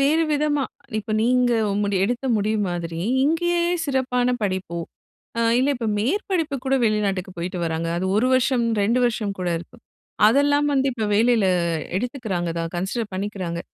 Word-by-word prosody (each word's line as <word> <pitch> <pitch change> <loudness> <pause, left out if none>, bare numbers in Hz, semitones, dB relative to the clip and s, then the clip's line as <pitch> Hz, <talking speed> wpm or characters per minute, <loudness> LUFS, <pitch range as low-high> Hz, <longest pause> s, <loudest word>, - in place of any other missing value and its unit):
வேறு 305 +4 +3
விதமா, 295 -1 +1 0.3
இப்ப 215 +1 -4
நீங்க 250 +1 +3 0.3
முடி 200 -1 0
எடுத்த 245 +4 -2
முடிவு 210 +1 0
மாதிரி, 170 -1 -4 0.2
இங்கேயே 345 +3 +1 0.2
சிறப்பான 250 -3 +1
படிப்போ, 185 -3 -2 0.6
அ - - +2 0.2
இல்ல 265 +3 +2
இப்ப 235 -2 -3
மேற்படிப்பு 325 - -1
கூட 270 0 +1
வெளிநாட்டுக்கு 200 -4 0
போய்ட்டு 180 +2 -4
வராங்க. 165 0 -2
அது 185 +2 -1
1 230 - +3
வருஷம், 255 -1 +2 0.2
2 230 +5 +2
வருஷம்கூட 200 -6 -2
இருக்கு. 175 +8 -13 0.5
அதெல்லாம் 285 +3 +3
வந்து 270 0 +2
இப்ப 225 -3 -3
வேலையில 225 -1 +3 0.5
எடுத்துக்கிறாங்க 220 -7 -2
தான், 165 0 -3
கன்சிடர் 205 +5 -3
பண்ணிக்கிறாங்க. 185 -3 -3
225 Hz, 145 wpm, -23 LUFS, 190-270 Hz, 0.6 s, வேறு